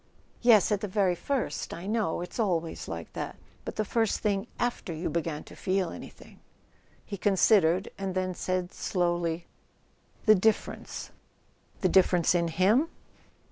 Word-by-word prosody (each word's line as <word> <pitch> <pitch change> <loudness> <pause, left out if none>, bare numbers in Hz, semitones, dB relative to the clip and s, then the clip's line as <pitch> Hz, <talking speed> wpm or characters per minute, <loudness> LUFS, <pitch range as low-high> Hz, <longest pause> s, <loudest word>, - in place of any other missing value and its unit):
"Yes—at 215 -4 +5
the 210 - -2
very 190 -2 +2
first, 265 +8 -2
I 170 - -8
know: 210 -5 0
it's 180 - -7
always 170 -7 -1
like - - -6
that. - - -4 0.3
But - - -6
the 215 - 0
first 225 0 0
thing 205 0 0
after 240 -7 -2
you 165 +2 -3
began 165 -3 -2
to - - -13
feel 185 -2 0
any¬ - - -8
thing?" - - -17 0.7
He 200 - -5
considered, 195 -2 +4
and 190 -1 -3
then 185 0 0
said 185 0 -2
slowly: 175 -2 -1 0.8
"The 215 - +8
differ¬ 215 +2 +2
ence." - - -8 0.7
"The 185 - +3
difference 180 -2 +4
in 170 -1 +2
him?" 200 - +3
185 Hz, 150 wpm, -28 LUFS, 175-210 Hz, 0.8 s, The